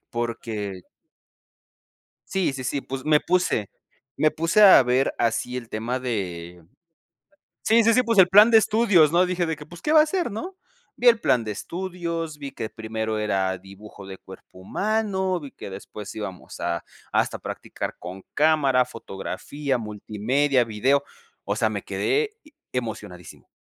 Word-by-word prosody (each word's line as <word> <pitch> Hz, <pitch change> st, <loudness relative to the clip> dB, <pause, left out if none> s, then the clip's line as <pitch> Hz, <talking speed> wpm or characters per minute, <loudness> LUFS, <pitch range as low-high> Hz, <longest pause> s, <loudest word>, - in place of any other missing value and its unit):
porque 110 Hz, -5 st, -4 dB, 1.5 s
Sí, 190 Hz, -6 st, 0 dB
sí, 130 Hz, -1 st, -6 dB
sí. 140 Hz, +3 st, -1 dB
Pues 135 Hz, 0 st, -6 dB
me 150 Hz, -1 st, +4 dB
puse 175 Hz, -, 0 dB, 0.5 s
me 155 Hz, +2 st, +3 dB
puse 165 Hz, +8 st, +2 dB
a 190 Hz, -8 st, +9 dB
ver 125 Hz, +2 st, +1 dB
así 120 Hz, +2 st, 0 dB
el 120 Hz, -2 st, -6 dB
tema 115 Hz, +4 st, -3 dB
de 90 Hz, -8 st, -4 dB, 1.0 s
Sí, 225 Hz, +1 st, +4 dB
sí, 230 Hz, +1 st, +4 dB
sí, 255 Hz, -, +4 dB
pues 230 Hz, -4 st, +2 dB
el 185 Hz, -, +8 dB
plan 205 Hz, +5 st, +7 dB
de 225 Hz, -, +8 dB
estudios, 210 Hz, -8 st, +4 dB
¿no? 175 Hz, +2 st, +4 dB
Dije 180 Hz, -1 st, -1 dB
de 160 Hz, -1 st, -2 dB
que: 150 Hz, 0 st, -11 dB
"Pues 175 Hz, +2 st, -13 dB
¿qué 300 Hz, -, -1 dB
va 310 Hz, -, +8 dB
a -, -, +3 dB
ser, 345 Hz, -4 st, -1 dB
no?" 355 Hz, -, -6 dB, 0.4 s
Vi 245 Hz, -1 st, +1 dB
el 230 Hz, -2 st, +7 dB
plan 125 Hz, -, +2 dB
de 110 Hz, -, -4 dB
estudios, 170 Hz, -, -4 dB
vi 140 Hz, -2 st, -7 dB
que 115 Hz, -4 st, -5 dB
primero 110 Hz, 0 st, -4 dB
era 95 Hz, -3 st, 0 dB
dibujo 100 Hz, +2 st, -13 dB
de 95 Hz, 0 st, -9 dB
cuerpo 95 Hz, -1 st, -14 dB
humano, 190 Hz, -, -1 dB
vi 145 Hz, -4 st, -9 dB
que -, -, -9 dB
después 100 Hz, +1 st, -8 dB
íbamos 95 Hz, -4 st, -7 dB
a -, -, -2 dB, 0.3 s
hasta -, -, +1 dB
a -, -, -23 dB
practicar -, -, -6 dB
con 95 Hz, +2 st, -9 dB
cámara, 140 Hz, -5 st, +3 dB
fotografía, 125 Hz, +5 st, -4 dB
multimedia, 115 Hz, +6 st, 0 dB
video. 125 Hz, +6 st, +1 dB, 0.4 s
O -, -, -1 dB
sea, -, -, +1 dB
me -, -, -4 dB
quedé 425 Hz, +1 st, 0 dB, 0.4 s
emocionadísimo, 105 Hz, -, -6 dB
135 Hz, 160 wpm, -24 LUFS, -, 1.5 s, a